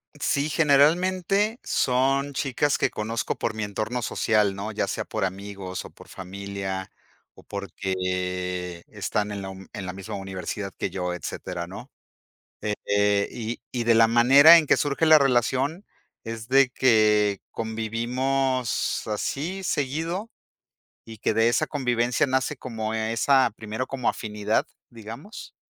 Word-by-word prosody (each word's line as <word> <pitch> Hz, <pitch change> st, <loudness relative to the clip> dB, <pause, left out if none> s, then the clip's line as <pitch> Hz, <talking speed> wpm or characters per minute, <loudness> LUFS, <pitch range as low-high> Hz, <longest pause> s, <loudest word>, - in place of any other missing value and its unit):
Sí, 145 Hz, +2 st, 0 dB
generalmente 180 Hz, -, +3 dB
son 135 Hz, +2 st, +1 dB
chicas 140 Hz, +1 st, 0 dB
que -, -, +1 dB
conozco 110 Hz, +2 st, -3 dB
por -, -, -2 dB
mi 110 Hz, -, -4 dB
entorno 110 Hz, +4 st, -2 dB
social, 105 Hz, -3 st, +1 dB
¿no? 105 Hz, +2 st, -4 dB
Ya 100 Hz, -, -1 dB
sea -, -, -3 dB
por 110 Hz, -3 st, -2 dB
amigos, 95 Hz, -1 st, -5 dB
o -, -, -10 dB
por -, -, -16 dB
familia, 95 Hz, 0 st, -6 dB, 0.4 s
o -, -, -16 dB
porque, 90 Hz, -2 st, -3 dB
están 105 Hz, 0 st, -2 dB
en 100 Hz, -1 st, -5 dB
la 95 Hz, -, -6 dB
un 95 Hz, 0 st, -11 dB
en 100 Hz, -, -5 dB
la 90 Hz, -, -4 dB
misma 95 Hz, +3 st, -7 dB
universidad 95 Hz, +1 st, -5 dB
que -, -, -2 dB
yo, 90 Hz, -1 st, -3 dB
etcétera, 90 Hz, 0 st, -5 dB
¿no? 100 Hz, +9 st, -10 dB, 0.7 s
Eh, 100 Hz, -1 st, +1 dB
y 115 Hz, 0 st, -5 dB
y 120 Hz, -2 st, -2 dB
de 115 Hz, 0 st, +4 dB
la 115 Hz, 0 st, +6 dB
manera 135 Hz, +8 st, +8 dB
en 160 Hz, -, 0 dB
que -, -, +4 dB
surge 145 Hz, +2 st, +1 dB
la 155 Hz, -1 st, +8 dB
relación 135 Hz, -, +1 dB, 0.4 s
es 115 Hz, 0 st, -6 dB
de 135 Hz, 0 st, +5 dB
que 105 Hz, -5 st, +3 dB
convivimos 120 Hz, +3 st, -1 dB
así 150 Hz, -, -3 dB
seguido, 165 Hz, -, -2 dB, 0.8 s
y 110 Hz, -1 st, -10 dB
que 110 Hz, -, 0 dB
de 115 Hz, +2 st, +4 dB
esa 120 Hz, -, +2 dB
convivencia 125 Hz, -2 st, +1 dB
nace 130 Hz, +2 st, 0 dB
como 110 Hz, -4 st, -4 dB
e 110 Hz, 0 st, -1 dB
esa 130 Hz, +3 st, +3 dB
primero 110 Hz, +4 st, -4 dB
como 130 Hz, -3 st, -1 dB
afinidad, 105 Hz, -1 st, -1 dB, 0.2 s
digamos, 115 Hz, -, -10 dB
115 Hz, 145 wpm, -25 LUFS, 100-135 Hz, 0.8 s, manera